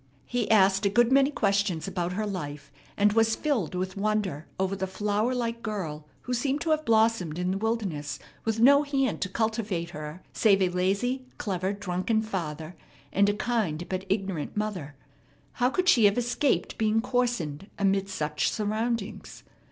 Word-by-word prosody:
He 245 -2 -2
asked 195 -1 +5
a 200 - +3
good 240 +4 +3
many 275 +1 +5
questions 200 - 0
about 180 -2 -2
her 215 +3 -1
life, 150 -8 -5 0.3
and 205 0 +4
was 225 0 +3
filled 250 - -1
with 185 +1 -3
wonder 200 -6 -1
over 190 +1 0
the 190 0 -2
flower 210 +5 0
like 230 -1 -2
girl 165 -9 -4
who 250 - -4
seemed 270 +4 0
to 325 - 0
have 310 0 +1
blossomed 220 - +2
in 180 +1 0
the 190 - -1
wilderness 190 - -2 0.3
with 225 0 -1
no 280 +5 +7
hand 275 -5 0
to 185 - -1
cultivate 215 -6 -1
her 150 +3 -7
save 200 -3 +4
a 185 - +2
lazy, 200 +9 0
clever, 190 -2 -1
drunken 200 +2 -1
father, 165 -5 -4 0.4
and 200 +1 +4
a - - +2
kind 205 -9 -1
but 190 0 -3
ignorant 195 -4 -2
mother. 185 -9 -3 0.7
How 250 - +5
could 365 +6 -1
she 240 - +6
have 200 +2 +4
escaped 245 +3 0
being 220 0 +2
coarsened 230 - -1
amid 195 0 +1
such 150 -5 -1
surroundings. 220 0 -3
205 Hz, 165 wpm, -27 LUFS, 180-230 Hz, 0.7 s, no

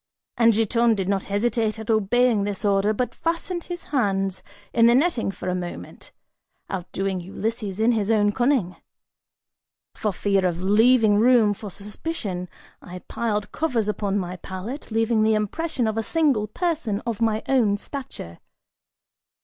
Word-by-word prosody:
And 230 -1 +5
Giton 225 +1 +2
did 190 -3 -2
not 195 -1 0
hesitate 220 +1 0
at 220 +1 -3
obeying 220 +1 +3
this 205 +1 -3
order, 200 +1 +3
but 245 +3 -2
fastened 335 +1 -3
his 350 -1 -6
hands 195 -7 0 0.3
in 230 0 +5
the 235 - +5
netting 275 - +2
for 195 - -6
a 180 - 0
moment, 175 -1 -7 0.6
outdoing 190 0 -3
Ulysses 205 +2 -4
in 225 +2 +4
his 215 -3 0
own 205 -2 +3
cunning! 240 -6 +1 1.2
For 210 - -2
fear 195 0 +1
of 175 -2 0
leaving 215 +2 +4
room 230 -3 +5
for 205 +1 -8
suspicion, 200 - -5 0.3
I 180 0 -10
piled 210 -3 -2
covers 245 -10 -1
upon 205 -1 -1
my 180 -1 -3
pallet, 190 +11 -7
leaving 225 0 +1
the 220 0 +3
impression 250 +6 -1
of 220 0 -1
a - - +1
single 275 -5 +1
person 295 - -2
of 230 -2 -4
my 220 -1 +1
own 230 -7 +3
stature. 205 - -8
215 Hz, 150 wpm, -24 LUFS, 195-240 Hz, 1.2 s, And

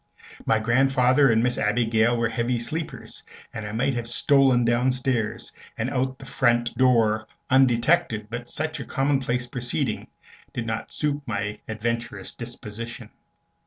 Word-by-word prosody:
My 110 - +4
grandfather 130 +3 +3
and 110 +1 +3
Miss 125 0 +1
Abigail 115 +1 +2
were 115 0 +1
heavy 120 +2 0
sleepers, 155 +7 -5 0.3
and 110 -1 -5
I - - -5
might 130 +5 0
have 120 -1 -3
stolen 130 0 +3
downstairs 125 -1 0 0.3
and - - -2
out 130 +1 0
at - - -26
the - - -11
front 120 -1 +1
door 115 -4 +3 0.2
undetected; 125 -3 +3
but 120 +2 -6
such 155 0 -3
a - - -4
commonplace 135 -3 0
proceeding 125 0 -3 0.5
did 120 - -3
not 110 0 -4
suit 145 -1 -1
my 105 -1 -3
adventurous 110 -2 -3
disposition. 115 -1 -8
120 Hz, 140 wpm, -25 LUFS, 115-130 Hz, 0.5 s, My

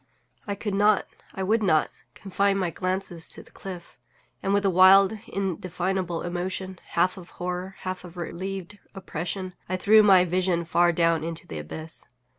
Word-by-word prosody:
I 200 - -2
could 205 0 -4
not, 205 +1 +3 0.3
I 190 - -2
would 220 +4 +2
not, 155 -7 +2 0.2
confine 195 0 0
my 180 -3 -1
glances 185 -2 -3
to - - -4
the - - -21
cliff; 180 -3 -9 0.4
and, 195 - -1
with 200 0 +2
a - - +4
wild, 190 +3 +7
indefinable 185 -2 -2
emotion, 185 +1 -4
half 180 +3 +1
of 180 -2 -11
horror, 180 +2 -4
half 185 -1 -4
of 180 0 -12
a - - -4
relieved 190 +3 -6 0.2
oppression, 185 0 -4 0.2
I 185 - 0
threw 215 +3 +6
my 190 -3 +6
vision 180 -1 0
far 175 +1 +3
down 165 -1 +2
into 165 0 -5
the 80 - -6
abyss. 155 - -8
185 Hz, 170 wpm, -26 LUFS, 175-195 Hz, 0.4 s, wild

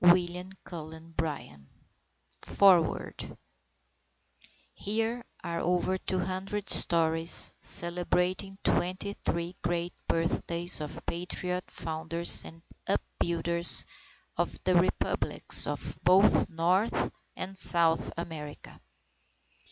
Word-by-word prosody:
_ 175 - +9
WILLIAM 180 +1 -2
CULLEN 160 -1 -9
BRYANT 140 - -5 0.7
FOREWORD 185 -5 +2 1.4
Here 225 +3 -1 0.2
are 170 -1 -3
over 180 +1 +1
200 190 +2 -3
stories 165 0 +4
celebrating 180 +3 0
23 180 -1 -1
great 175 0 -2
birthdays 170 +1 +1
of 150 - -7
patriot 180 +1 -3
founders 165 +1 0
and 165 0 -12 0.2
upbuilders 170 - 0 0.5
of - - 0
the 185 - +3
Republics 175 +1 +1
of - - -4
both 190 +3 +5
North 180 +6 +1 0.2
and 195 +1 -5
South 170 -3 +5
America. 155 -3 -8
175 Hz, 85 wpm, -29 LUFS, 165-185 Hz, 1.4 s, _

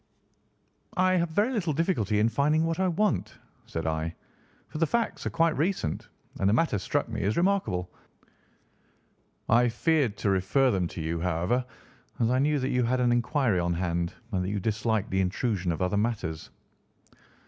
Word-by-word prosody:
"I 185 0 +4
have 170 -1 +1
very 205 +10 +1
little 175 -9 0
difficulty 140 - 0
in 105 +2 +4
finding 150 +7 +2
what 165 +2 -1
I 190 - +2
want," 200 +4 0 0.3
said 80 - -4
I, 80 +1 -2 0.5
"for 155 - -6
the 165 - +3
facts 235 +7 -1
are - - 0
quite 165 -1 +2
recent, 155 - -1 0.3
and 95 - +3
the - - +3
matter 125 -5 +2
struck - - -1
me - - -4
as 100 +3 0
remarkable. 170 - +1 1.6
I 120 +1 +4
feared 140 -4 +1
to 105 -2 0
refer 100 +8 +2
them 90 -3 0
to 85 - -7
you, 85 +1 -2
however, 90 +8 0 0.6
as 115 0 +2
I 130 - +2
knew 150 +2 +2
that 130 -1 -1
you 125 0 +1
had 130 +2 +1
an 125 -1 +3
inquiry 120 - +1
on 85 0 0
hand 85 -1 -2 0.2
and 95 -3 0
that 90 - -2
you 100 0 -1
disliked 110 +1 -1
the 95 0 +2
intrusion 95 -1 -1
of 85 +3 -2
other 90 +2 0
matters." 100 -8 -2
115 Hz, 180 wpm, -27 LUFS, 95-155 Hz, 1.6 s, I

